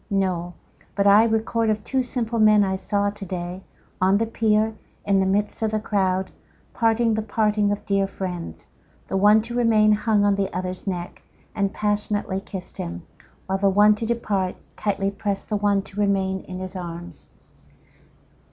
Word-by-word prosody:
—No; 185 -3 -1 0.4
But 200 - +1
I 205 +3 +7
record 225 0 0
of 215 -1 0
two 265 -1 0
simple 235 -2 -2
men 215 -1 +6
I 190 -1 0
saw 200 +1 -1
to 205 0 -9
day, 180 0 -5 0.4
on 190 +2 +4
the 225 - +1
pier, 220 -1 +1 0.3
in 200 -1 +3
the 190 - +2
midst 205 +3 0
of 220 - +1
the 215 0 -1
crowd, 190 -3 0 0.4
parting 230 0 +2
the 220 - 0
parting 210 -1 +1
of 205 - -3
dear 195 -1 +1
friends; 180 - -6 0.4
The - - -4
one 210 +3 +5
to 235 +1 -7
remain 225 -3 +4
hung 210 -1 +2
on 205 - +4
the 195 -1 -1
other's 185 +1 -5
neck, 175 -2 -4 0.3
and 200 -1 0
passionately 205 -2 -1
kiss'd 190 -2 -8
him, 85 0 -5 0.4
While 190 0 -1
the 200 0 +3
one 205 +2 +5
to 220 +2 -4
depart, 205 -5 -1 0.2
tightly 200 -1 -1
prest 200 -1 -4
the 210 - 0
one 200 -1 +1
to 200 +1 -10
remain 190 -1 +1
in 185 - -7
his 185 +1 -7
arms. 175 -2 -8
205 Hz, 175 wpm, -23 LUFS, 190-215 Hz, 0.4 s, I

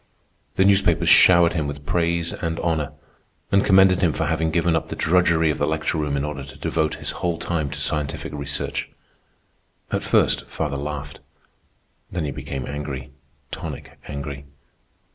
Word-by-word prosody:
The 95 - +4
newspapers 100 0 +3
showered 85 -2 +7
him 80 -3 -1
with 70 0 -7
praise 85 +1 0
and 80 0 -3
honor, 80 -4 -1 0.6
and 100 0 +4
commended 95 -2 +5
him 85 -5 +3
for - - -1
having 80 0 0
given 85 0 +2
up 80 - -1
the - - -5
drudgery 85 -2 +3
of - - -4
the - - +1
lecture 80 - -1
room 75 -2 -1
in 70 - -1
order 75 -2 -5
to 65 0 -11
devote 80 -2 0
his - - -3
whole 85 -2 0
time 80 -5 -2
to 70 0 -6
scientific 75 0 -2
research. 70 -1 -3 1.0
At - - 0
first - - +2
father 75 -3 -3
laughed. 75 0 -5 0.9
Then 85 -3 -2
he 70 - -2
became 65 0 -5
angry—tonic 70 -2 -8
angry. 70 -1 -6
75 Hz, 160 wpm, -23 LUFS, 70-85 Hz, 1.0 s, showered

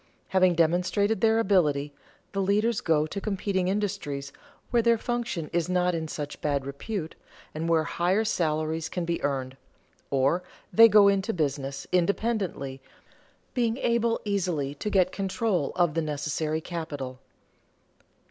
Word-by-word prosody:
Having 185 -2 +4
demonstrated 180 +5 +2
their 225 0 +4
ability, 150 -9 +2 0.4
the 195 - -1
leaders 210 +4 +1
go 155 -2 +2
to 195 +6 -5
competing 195 -3 -1
industries 185 -9 -2 0.4
where 240 - +4
their 235 0 +4
function 235 -9 -3
is 170 0 0
not 180 0 +2
in 160 -1 -2
such 145 -1 -6
bad 140 -2 0
repute, 160 +5 -5 0.4
and 160 +2 -3
where 165 -1 +3
higher 180 +7 +1
salaries 160 -3 -1
can 175 -2 -3
be 170 0 -2
earned; 135 -2 -2 0.5
or 140 +6 +2 0.3
they 230 +1 +9
go 205 -1 +7
into 200 +2 +2
business 140 -4 -2
independently, 180 - 0 0.7
being 235 -2 +1
able 235 -2 +1
easily 175 -9 -1
to 150 +9 -4
get 185 -3 +3
control 195 -4 -1
of 175 -4 +2
the 165 - 0
necessary 155 +1 -2
capital. 145 -7 -5
175 Hz, 140 wpm, -27 LUFS, 150-200 Hz, 0.7 s, they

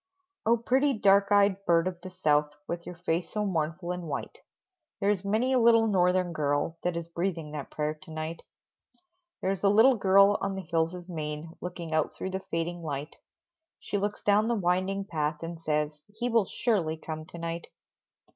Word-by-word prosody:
Oh, 235 +1 +5
pretty 265 +5 +2
dark 200 0 +4
eyed 200 -1 +4
bird 170 +1 +4
of 180 -1 -5
the 185 - -7
South, 150 -5 +1
With 170 0 -5
your 180 - -6
face 170 -1 -2
so 210 -1 -2
mournful 170 -1 -2
and 180 -2 -5
white 140 - -5 0.6
There 200 0 +3
is 200 -2 -1
many 220 +6 +1
a 255 - +4
little 230 -1 +6
Northern 180 -3 +2
girl 150 +2 -1
That 175 -1 -1
is 170 -1 -4
breathing 170 -2 -3
that 150 -2 -6
prayer 150 0 -2
to 160 +3 -17
night. 160 +1 -5 1.0
There's 190 -1 0
a 200 - +5
little 225 +6 +6
girl 195 +1 +5
on 195 0 -1
the 190 - -5
hills 165 +1 0
of 175 -1 -9
Maine 155 -1 -5
Looking 175 -2 -5
out 155 -1 +1
through 190 - -4
the 190 - -2
fading 170 +1 -2
light, 145 -1 -5 0.6
She 205 - -2
looks 205 +1 -3
down 210 +2 +4
the 235 - +1
winding 190 +1 0
path, 155 -3 -2
and 165 0 -6
says, 150 -1 -1
"He 235 +4 -3
will 230 -3 +3
surely 180 -8 0
come 155 0 -6
to - - -10
night!" 170 0 -4
175 Hz, 190 wpm, -28 LUFS, 160-200 Hz, 1.0 s, little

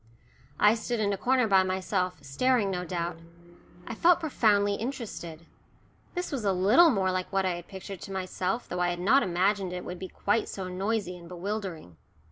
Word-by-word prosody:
I 210 +1 +6
stood 235 +1 -2
in 205 -1 +1
a - - 0
corner 250 +4 +2
by 195 -3 +5
myself, 185 -1 -1
staring, 210 - +1
no 180 -1 -2
doubt. 170 -1 -3 0.7
I - - -5
felt 340 +9 +4
profoundly 210 -10 +2
interested. 200 - -6 0.7
This 355 0 -3
was 270 -6 -3
a 195 -2 +2
little 210 - +6
more 190 -7 +1
like 185 0 -3
what 195 -1 +1
I 185 - +1
had 175 0 -8
pictured 190 -1 -8
to - - -8
myself, 190 +3 -2
though 180 - -4
I 175 0 +2
had 175 0 -3
not 225 +10 +4
imagined 190 0 +1
it 180 - -5
would 180 0 -6
be 190 - -5
quite 210 +2 0
so 190 -2 -5
noisy 190 0 -2
and 170 -1 -12
bewildering. 180 - -5
190 Hz, 190 wpm, -28 LUFS, 180-220 Hz, 0.7 s, I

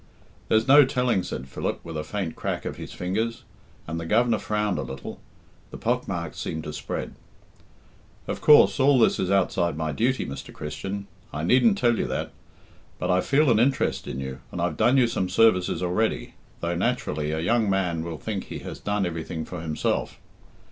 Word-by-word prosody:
"There's 110 +1 +2
no 145 +2 +9
telling," 125 -6 +1
said 65 -6 -6
Philip, 65 - -3
with 85 -1 -7
a 75 - -2
faint 85 +1 -4
crack - - -3
of - - -4
his - - -8
fingers; 110 +6 -2 0.4
and 80 +1 -4
the 85 - -5
Governor 115 +4 +3
frowned 105 -2 -1
a - - -1
little 65 0 -7 0.5
the - - -8
pock - - -1
marks - - -4
seemed 80 0 -4
to 75 -1 -6
spread. - - -5 1.1
"Of - - -4
course, 150 -1 +6
all 140 0 +5
this 115 - +4
is 90 - 0
outside 90 -4 +1
my 80 -1 -1
duty, 125 - 0
Mr. 70 - -7
Christian 100 +6 -5 0.3
I 75 - -4
needn't 130 - +4
tell 120 - +2
you - - 0
that; - - -3 0.7
but 90 - -1
I 90 0 +3
feel 140 0 +3
an 110 - +4
interest 130 +3 +1
in 65 - -4
you, 65 -1 -5
and - - -5
I've - - 0
done 130 +3 +3
you 130 - +5
some 95 -5 -1
services 90 -6 +3
already, 90 +5 0 0.3
though 85 +1 -1
naturally 85 -7 -1
a 80 +1 -1
young 110 +5 +2
man 90 -4 0
will 85 -1 -5
think 70 - -4
he - - -6
has - - -7
done 100 -1 -1
everything 80 -1 -4
for 90 -3 -7
himself. 80 -2 -2
95 Hz, 190 wpm, -25 LUFS, 80-115 Hz, 1.1 s, no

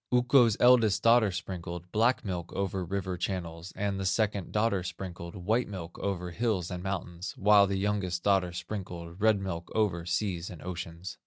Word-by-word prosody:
"Ukko's 125 -2 +5
eldest 120 -5 +5
daughter 115 -2 +6
sprinkled 90 -1 -6
Black 120 +3 +2
milk 90 -3 -4
over 95 -1 -2
river 95 0 -3
channels 85 -1 -4
And 100 -1 -1
the 95 - -2
second 100 0 0
daughter 105 -3 +1
sprinkled 85 -1 -7
White 110 +7 0
milk 90 -5 -7
over 90 -3 -2
hills 100 -3 -1
and 90 -1 -4
mountains, 90 -1 -4
While 100 0 +6
the 100 0 -1
youngest 95 -3 -1
daughter 95 -3 +3
sprinkled 90 -1 -6
Red 110 -2 +4
milk 85 -3 -5
over 90 -6 +1
seas 90 -3 -1
and 85 - -9
oceans. 90 +1 -6
95 Hz, 165 wpm, -29 LUFS, 90-105 Hz, -, daughter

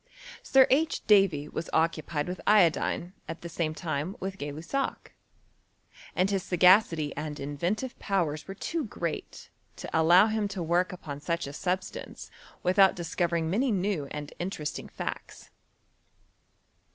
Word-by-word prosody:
Sir 265 -1 +5
H. 305 +4 +1
Davy 195 -8 +4
was 160 - -5
occu 160 -1 +2
pied 150 -1 -3
with 180 +1 -5
iodine 180 -2 +3 0.2
at 165 - -6
the 170 - -6
same 155 -1 -2
time 160 +2 -3
with 195 0 -5
Gay 145 0 -4
Lussac; 170 - -4 1.0
and 185 +2 +2
his 195 -1 +1
sagacity 180 -4 +4
and 150 0 -5
inventive 170 - -3
powers 165 -7 -1
were 195 - -6
too 325 - -3
great 170 - -5 0.2
to - - -8
allow 170 +5 +6
him 215 -1 0
to 195 -3 -4
woriL 175 +2 +1
upon 150 -6 -7
such 170 +3 -2
a 140 - -7
substance 180 +5 -4 0.3
without 190 +1 +5
discovering 170 -1 -1
many 235 +10 +1
new 190 -7 -1
and 150 +1 -7
interesting 175 -4 -4
facts. - - -7
175 Hz, 140 wpm, -28 LUFS, 155-195 Hz, 1.0 s, allow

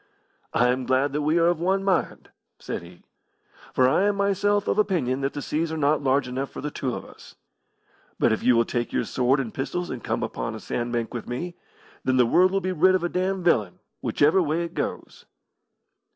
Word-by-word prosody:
"I 125 +1 +3
am 125 0 -1
glad 135 +2 +2
that 150 - 0
we 155 +3 +2
are 165 - +4
of 170 -1 +2
one 190 +3 +1
mind," 190 -3 -1 0.3
said - - -5
he, 85 0 -15 0.7
"for 130 - +3
I 190 +10 +3
am 205 - +1
myself 200 +1 +1
of - - +1
opinion 150 -11 +1
that 135 0 -1
the 145 - -5
seas 160 +1 -1
are 160 - -3
not 150 0 +2
large 135 0 +1
enough 130 +2 -3
for - - -9
the 150 - -4
two 130 -4 -3
of - - -7
us. - - -15 0.8
But - - +3
if 110 - 0
you 125 - +4
will 115 0 +3
take 120 0 -2
your - - 0
sword 130 +4 +1
and 115 -5 -4
pistols 175 +6 -3
and 125 -4 -6
come - - -2
upon - - -4
a - - -7
sand 120 0 -3
bank 120 -1 -2
with 120 - -5
me, 170 +9 -4 0.5
then 130 0 +1
the 125 - +5
world 180 +10 +4
will 195 0 0
be 185 0 -2
rid 185 +2 +4
of 185 - 0
a 175 - 0
damned 185 0 -1
villain, 105 - +2 0.2
whichever 155 +6 +3
way 165 +1 0
it 170 - -6
goes." - - -5
145 Hz, 225 wpm, -25 LUFS, 125-180 Hz, 0.8 s, the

